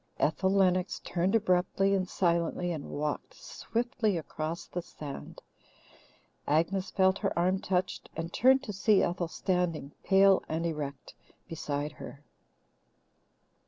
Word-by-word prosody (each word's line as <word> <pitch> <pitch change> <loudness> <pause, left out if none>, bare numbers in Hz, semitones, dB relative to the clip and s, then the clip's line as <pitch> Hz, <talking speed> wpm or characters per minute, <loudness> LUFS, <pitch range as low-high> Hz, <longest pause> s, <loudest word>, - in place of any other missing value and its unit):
Ethel 190 +5 +1
Lennox 185 -1 +2
turned 180 +4 0
abruptly 195 -1 +2
and 185 -2 0
silently 170 0 0
and 155 -4 -5
walked 150 - -3
swiftly 235 - -2
across 160 +1 -4
the 175 - -4
sand. 150 -4 -9 1.0
Agnes 175 +6 +1
felt 190 0 +2
her 195 - -1
arm 185 +2 +2
touched, 185 0 -2
and 165 +2 -5
turned 265 +2 +5
to 210 - -5
see 200 +1 +3
Ethel 175 0 -1
standing, 170 -4 -1
pale 195 0 +5
and 160 +2 -1
erect, 145 -4 -4 0.3
beside 150 -3 -3
her. 145 0 -10
180 Hz, 125 wpm, -30 LUFS, 165-195 Hz, 1.0 s, turned